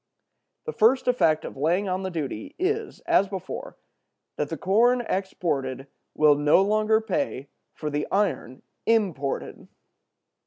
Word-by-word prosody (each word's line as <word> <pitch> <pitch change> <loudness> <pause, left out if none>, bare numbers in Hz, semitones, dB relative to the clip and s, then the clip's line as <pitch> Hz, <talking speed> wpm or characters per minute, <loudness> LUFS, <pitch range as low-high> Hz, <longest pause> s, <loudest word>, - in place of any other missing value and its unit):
The 465 - -4
first 250 +5 +3
effect 165 -11 +2
of - - -7
laying 170 +8 +1
on 185 0 -1
the 190 - -3
duty 175 - -5
is, 425 +5 -2
as 200 - +3
before, 190 -2 -7 0.6
that 150 - -2
the 165 - -4
corn 235 - +3
exported 155 - -2 0.3
will 150 -1 +5
no 145 +5 +4
longer 215 +2 +2
pay 220 - -3 0.3
for 150 -1 -4
the 145 +1 -2
iron 195 - -1 0.2
imported. 185 -12 -1
190 Hz, 130 wpm, -25 LUFS, 150-225 Hz, 0.6 s, will